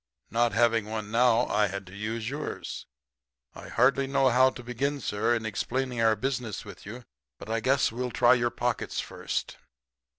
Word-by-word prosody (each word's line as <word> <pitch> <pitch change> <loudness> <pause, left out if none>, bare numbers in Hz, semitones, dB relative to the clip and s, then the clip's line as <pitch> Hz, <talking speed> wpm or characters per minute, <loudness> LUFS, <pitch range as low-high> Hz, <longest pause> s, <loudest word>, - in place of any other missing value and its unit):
Not 115 -1 +2
having 115 -1 +3
one 110 -1 -5
now 120 0 +4
I 105 0 +2
had 100 0 -5
to 90 +2 -12
use 110 +2 -4
yours. 145 +4 -5 0.7
I - - -10
hardly 135 +3 +2
know 135 -1 +3
how 130 +2 +5
to 125 - -10
begin, 135 +4 -2
sir, 115 0 0
in 115 -1 -3
explaining 120 +3 -2
our 110 -1 +4
business 120 -4 -3
with 100 -1 -11
you, 120 +4 -8 0.3
but 110 - -8
I 115 - +1
guess 130 +3 +2
we'll 125 +2 -3
try 120 0 +5
your 120 -1 +2
pockets 120 0 -2
first.' - - -4
120 Hz, 175 wpm, -28 LUFS, 110-125 Hz, 0.7 s, how